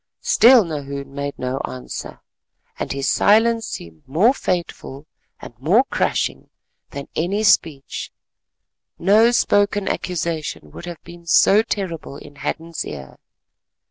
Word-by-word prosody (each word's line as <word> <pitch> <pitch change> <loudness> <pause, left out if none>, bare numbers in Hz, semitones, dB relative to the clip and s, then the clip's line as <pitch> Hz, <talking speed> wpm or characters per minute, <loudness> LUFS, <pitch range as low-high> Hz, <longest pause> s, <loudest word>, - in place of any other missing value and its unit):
Still 235 -1 +6
Nahoon 140 -3 -6
made 140 0 -4
no 130 +1 -3
answer, 65 - -7 0.6
and - - -3
his 135 -1 -2
silence 225 +2 +3
seemed 80 -2 -8
more 185 - +4
fateful 170 - -4 0.3
and - - -10
more 185 - +4
crushing - - -1 0.4
than 140 -1 -7
any 195 +6 0
speech; 160 -8 +1 0.9
no 215 +6 +5
spoken 205 -4 +2
accusation 160 - -3
would 175 - -10
have 175 -2 -8
been 170 0 -13
so 200 +5 +5
terrible 175 -10 -4
in 145 0 -14
Hadden's 165 +3 -4
ear. 70 -3 -9
165 Hz, 120 wpm, -21 LUFS, 140-205 Hz, 0.9 s, Still